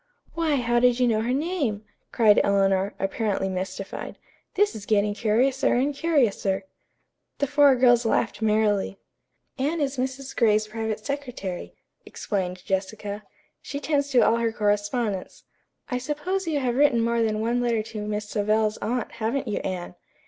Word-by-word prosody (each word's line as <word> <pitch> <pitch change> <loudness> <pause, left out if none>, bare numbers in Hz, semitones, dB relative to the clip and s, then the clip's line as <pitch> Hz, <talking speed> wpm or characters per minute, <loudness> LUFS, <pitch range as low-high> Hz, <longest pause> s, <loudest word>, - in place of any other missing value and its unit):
"Why, 325 -3 +1
how 240 -2 +2
did 245 0 +3
you 250 - +3
know 220 -2 +2
her 235 +2 -1
name?" 275 - -1 0.3
cried 215 -3 +5
Eleanor, 195 0 +2
apparently 195 0 -1
mystified. 190 +1 -5 0.4
"'This 415 +1 +3
is 210 -2 -8
getting 205 -1 +2
curiouser 245 +6 +2
and 270 +4 +1
curiouser.'" 235 -11 +1 0.7
The 285 - +1
four 285 -1 +5
girls 245 -1 +4
laughed 225 0 0
merrily. 210 -2 +1 0.6
"Anne 300 +5 0
is 280 -2 -1
Mrs. 265 +1 -4
Gray's 215 -2 +3
private 220 0 -4
secretary," 250 -10 -5 0.3
explained 185 -3 -4
Jessica. 200 +2 -3 0.4
"She 280 - -5
tends 285 -1 0
to 255 -3 +4
all 230 - +3
her 230 -1 0
correspondence. 205 -1 -1 0.5
I 250 - 0
suppose 320 +8 -3
you 305 -3 0
have 250 -1 -1
written 280 -5 +4
more 235 0 +1
than 215 -1 0
one 235 +2 0
letter 235 -3 +1
to 215 -1 -7
Miss 210 0 -3
Savell's 215 0 +1
aunt, 240 +3 -2
haven't 240 +5 -2
you, 210 - -1
Anne!" 180 -2 -4
230 Hz, 155 wpm, -25 LUFS, 210-265 Hz, 0.7 s, cried